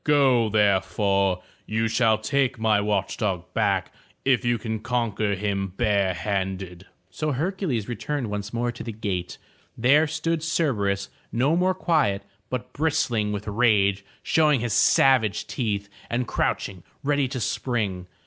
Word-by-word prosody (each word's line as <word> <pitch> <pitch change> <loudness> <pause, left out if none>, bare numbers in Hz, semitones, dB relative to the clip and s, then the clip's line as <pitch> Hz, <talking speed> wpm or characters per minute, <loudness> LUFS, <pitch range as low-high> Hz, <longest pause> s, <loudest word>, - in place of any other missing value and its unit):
Go, 135 -6 +4
therefore. 100 -2 +2 0.2
You 110 +1 0
shall 110 -1 +3
take 125 +4 0
my 110 -2 +2
watch 105 -2 -1
dog 95 -4 -2
back - - 0 0.3
if 130 -2 +3
you 120 0 +2
can 110 0 -4
conquer 110 -3 -1
him 100 -1 -2
barehanded." 95 -3 -1 0.2
So 150 +11 -2
Hercules 155 - -2
returned 120 0 -3
once 105 0 -4
more 120 +1 -1
to 120 - -8
the 115 - -5
gate. 95 -5 -4 0.4
There 145 +7 +4
stood 160 +2 -1
Cerberus, 110 -12 0 0.2
no 135 +7 +2
more 185 +1 +2
quiet, 150 - +1 0.3
but 125 0 -4
bristling 130 -9 0
with 105 0 -4
rage, 100 -3 +2 0.2
showing 150 -5 +3
his 120 -3 -1
savage 120 -5 +4
teeth, 105 -5 -2 0.2
and 120 0 -1
crouching 95 -3 -1 0.2
ready 145 -1 +1
to 130 0 -4
spring. 105 -6 -2
110 Hz, 140 wpm, -25 LUFS, 100-130 Hz, 0.4 s, Go